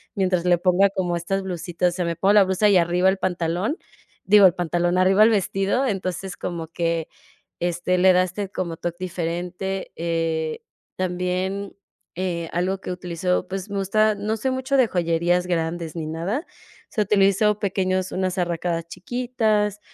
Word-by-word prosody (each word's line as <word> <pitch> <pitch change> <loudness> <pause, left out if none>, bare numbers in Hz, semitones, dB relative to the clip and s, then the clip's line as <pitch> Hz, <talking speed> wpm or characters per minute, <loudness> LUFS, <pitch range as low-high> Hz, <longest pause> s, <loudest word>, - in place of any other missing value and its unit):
mientras 185 -3 +1
le 180 -1 +4
ponga 185 +2 +3
como 180 -3 -1
estas 195 +3 -2
blusitas. 175 -1 -1
O - - -8
sea 180 - -1
me 170 -1 -2
pongo 195 +3 +3
la 210 -1 +7
blusa 190 +2 +2
y 205 - +4
arriba 175 +2 +2
el 190 +1 +3
pantalón, 180 - -1 0.5
digo, 205 0 +6
el 180 - +6
pantalón, 175 +1 0
arriba 190 +3 +5
el 220 - +6
vestido, 200 +5 +1
entonces 190 -3 -3
como 170 -2 -4
que, 165 -1 -2 0.5
este, 175 +1 0
le 185 +1 +6
das 180 0 +2 0.2
como 170 -3 -3
toc 170 0 -4
diferente. 180 +2 -4
Eh, 165 -1 -2 0.4
también, 185 +2 -2 0.4
eh, 170 -2 -2
algo 185 +3 0
que 190 - -6
utilizó, 180 0 -2
pues 190 +2 -5
me 200 - -2
gusta, 215 +3 +2
no 210 +2 -2
soy 260 +4 -1
mucho 260 +1 0
de 255 -3 +5
joyerías 175 0 +1
grandes 165 -1 -2
ni 165 -2 -4
nada, 175 - -3
o - - -28 0.4
sea, 215 - +1
utilizo 200 +1 +3
pequeños 185 -2 -1
unas 185 0 -2
arracadas 170 -1 -1
chiquitas, 215 0 -1
185 Hz, 165 wpm, -23 LUFS, 175-195 Hz, 0.5 s, la